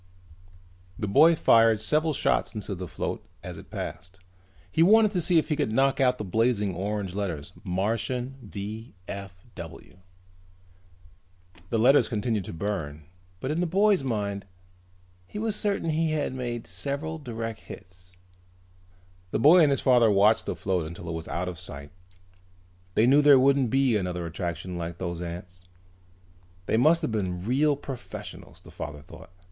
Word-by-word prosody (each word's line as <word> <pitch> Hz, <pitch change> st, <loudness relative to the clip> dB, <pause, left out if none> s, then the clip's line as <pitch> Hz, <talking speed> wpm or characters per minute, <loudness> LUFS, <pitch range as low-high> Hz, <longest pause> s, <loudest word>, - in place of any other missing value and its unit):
The 105 Hz, -, -3 dB
boy 160 Hz, +12 st, +6 dB
fired 115 Hz, -6 st, +5 dB
several 155 Hz, +6 st, +1 dB
shots 130 Hz, -, 0 dB
into 105 Hz, -1 st, -4 dB
the 90 Hz, -1 st, -6 dB
float -, -, -4 dB, 0.2 s
as -, -, -7 dB
it -, -, -14 dB
passed. 90 Hz, +1 st, -7 dB, 0.5 s
He 160 Hz, -, +1 dB
wanted 215 Hz, +4 st, +6 dB
to 180 Hz, -4 st, 0 dB
see 170 Hz, +1 st, +3 dB
if 160 Hz, -, +2 dB
he 150 Hz, -, +1 dB
could 145 Hz, -7 st, -1 dB
knock 135 Hz, +4 st, +2 dB
out 125 Hz, -1 st, +3 dB
those 105 Hz, -, -5 dB
blazing 110 Hz, -3 st, +1 dB
orange 100 Hz, +1 st, -3 dB
letters: 90 Hz, -5 st, -4 dB
MARTIAN 115 Hz, +7 st, -2 dB
V.F.W. 100 Hz, -4 st, -9 dB, 1.7 s
The 115 Hz, -, 0 dB
letters 125 Hz, +6 st, +5 dB
continued 105 Hz, -3 st, -1 dB
to -, -, -6 dB
burn, 80 Hz, -5 st, -4 dB, 0.4 s
but 130 Hz, -, -3 dB
in 155 Hz, -, -1 dB
the 180 Hz, -, +1 dB
boy's 195 Hz, -1 st, +3 dB
mind 100 Hz, -5 st, -3 dB, 0.8 s
he -, -, -8 dB
was 220 Hz, -1 st, -1 dB
certain 200 Hz, -6 st, 0 dB
he 160 Hz, 0 st, 0 dB
had 145 Hz, -4 st, -1 dB
made 120 Hz, -2 st, -4 dB
several 155 Hz, +3 st, -4 dB
direct 115 Hz, -4 st, -5 dB
hits. 90 Hz, +1 st, -13 dB, 1.2 s
The -, -, -1 dB
boy 155 Hz, +9 st, +7 dB
and 150 Hz, -, +5 dB
his 140 Hz, -, +1 dB
father 120 Hz, -3 st, +5 dB
watched 105 Hz, +2 st, +4 dB
the -, -, -2 dB
float 90 Hz, -4 st, -1 dB
until 85 Hz, 0 st, -8 dB
it -, -, -3 dB
was 80 Hz, 0 st, -6 dB
out 90 Hz, +1 st, -3 dB
of 90 Hz, -2 st, -5 dB
sight. 70 Hz, -5 st, -6 dB, 1.0 s
They 110 Hz, -, +4 dB
knew 140 Hz, +4 st, +6 dB
there 145 Hz, -2 st, +7 dB
wouldn't 135 Hz, -1 st, +3 dB
be 135 Hz, -1 st, +2 dB
another 90 Hz, -3 st, -2 dB
attraction 85 Hz, +1 st, -4 dB
like 85 Hz, 0 st, -5 dB
those 85 Hz, -1 st, -4 dB
ants. 90 Hz, +1 st, -8 dB, 1.0 s
They -, -, 0 dB
must 155 Hz, +8 st, +4 dB
have -, -, -1 dB
been 90 Hz, -5 st, -2 dB
real 140 Hz, +5 st, +2 dB
professionals, 135 Hz, -3 st, -9 dB
the -, -, -15 dB
father 75 Hz, 0 st, -7 dB
thought. -, -, -13 dB
110 Hz, 160 wpm, -27 LUFS, 90-140 Hz, 1.7 s, boy